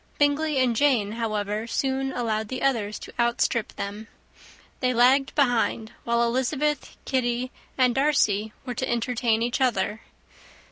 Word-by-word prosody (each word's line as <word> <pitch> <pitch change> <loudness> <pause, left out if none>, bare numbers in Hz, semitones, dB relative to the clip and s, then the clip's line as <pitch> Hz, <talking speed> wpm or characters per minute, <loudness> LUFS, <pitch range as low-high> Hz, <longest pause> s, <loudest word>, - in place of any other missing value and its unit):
Bingley 290 +1 +2
and 255 -3 +2
Jane, 235 -6 +2
however, 215 -1 -2
soon 270 +2 -1
allowed 220 -3 -1
the 255 +3 -5
others 225 -6 0
to - - -11
outstrip 235 -1 +1
them. 205 +2 -6 0.7
They 255 -1 +1
lagged 265 +3 +4
behind, 240 -5 +1
while 235 0 +2
Elizabeth, 265 +5 -1
Kitty, 250 -1 -1 0.3
and 250 -2 +4
Darcy 220 -7 +2
were 250 - -3
to 260 +2 -3
entertain 235 -1 +1
each 240 +3 -1
other. 215 -4 +1
240 Hz, 135 wpm, -25 LUFS, 220-265 Hz, 0.7 s, lagged